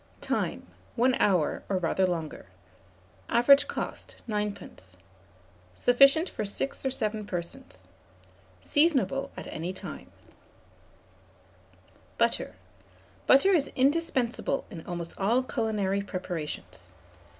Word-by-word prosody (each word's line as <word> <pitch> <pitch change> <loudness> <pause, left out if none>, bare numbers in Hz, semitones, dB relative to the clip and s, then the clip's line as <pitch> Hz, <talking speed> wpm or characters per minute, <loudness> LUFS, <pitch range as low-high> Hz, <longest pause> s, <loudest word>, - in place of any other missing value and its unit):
Time. - - -2 0.3
1 255 +2 +3
hour, 180 -7 +2
or 195 - +1
rather 185 +2 +1
longer. 165 -4 -4 0.8
Average 260 +4 +6
cost, - - -5
9d. 210 - -5 0.8
Sufficient 275 - +5
for - - -4
6 210 +7 -3
or 265 - +1
7 215 -4 -2
persons. 185 +10 -6 0.8
Seasonable 275 -3 +2
at - - -6
any 170 +3 -4
time. - - -9 2.1
BUTTER. - - 0 0.7
Butter 275 +9 +6
is 300 -6 +2
indispensable 270 -2 +1
in 165 -5 -8
almost 170 -1 -4
all 230 +6 +2
culinary 215 -5 -1
preparations. 165 - -6
215 Hz, 95 wpm, -28 LUFS, 180-270 Hz, 2.1 s, Average